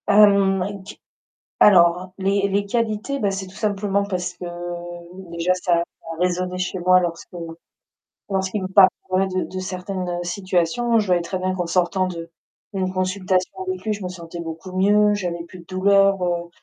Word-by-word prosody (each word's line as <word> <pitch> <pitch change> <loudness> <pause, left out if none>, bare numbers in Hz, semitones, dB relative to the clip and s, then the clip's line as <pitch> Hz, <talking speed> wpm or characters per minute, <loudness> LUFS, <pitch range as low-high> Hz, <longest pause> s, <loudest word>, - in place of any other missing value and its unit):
Hem, 200 -2 +5
avec 200 +1 -4
du 195 - -10 0.7
alors 180 -2 +5
les 195 +1 +1
les 200 +1 0
qualités 230 +5 -1
bah, 205 -6 +1
c'est 195 0 -4
tout 185 - -14
simplement 200 -1 0
parce 180 -3 -3
que, 180 - -9
heu, - - -4 0.8
déjà 170 +2 +1
ça 180 -2 +1 0.2
a 165 0 -7
résonné 180 0 0
chez 185 +1 -2
moi 185 +1 +5
lorsque 170 -2 -4 1.0
lorsqu'il 190 +1 -1
me - - -2
parlait 190 0 +4
de 185 -1 -1
de 185 - -6
certaines 185 -1 -4
situations. 185 +5 +1
Je 210 - -1
voyais 180 -1 +3
très 180 +2 -3
bien 185 0 -1
qu'en 175 -2 -2
sortant 185 +2 +1
de 170 -2 -6 0.4
d'une 185 -1 -1
consultation 185 0 0 0.2
avec 370 0 -3
lui, 220 - -1
je 205 - -7
me - - -2
sentais 170 -1 -8
beaucoup 165 +2 -7
mieux, 205 +3 +4
j'avais 175 -4 -3
plus 175 +2 -12
de 170 - -14
douleur, 195 +2 +4
heu, 175 -1 -1
185 Hz, 175 wpm, -22 LUFS, 180-200 Hz, 1.0 s, Hem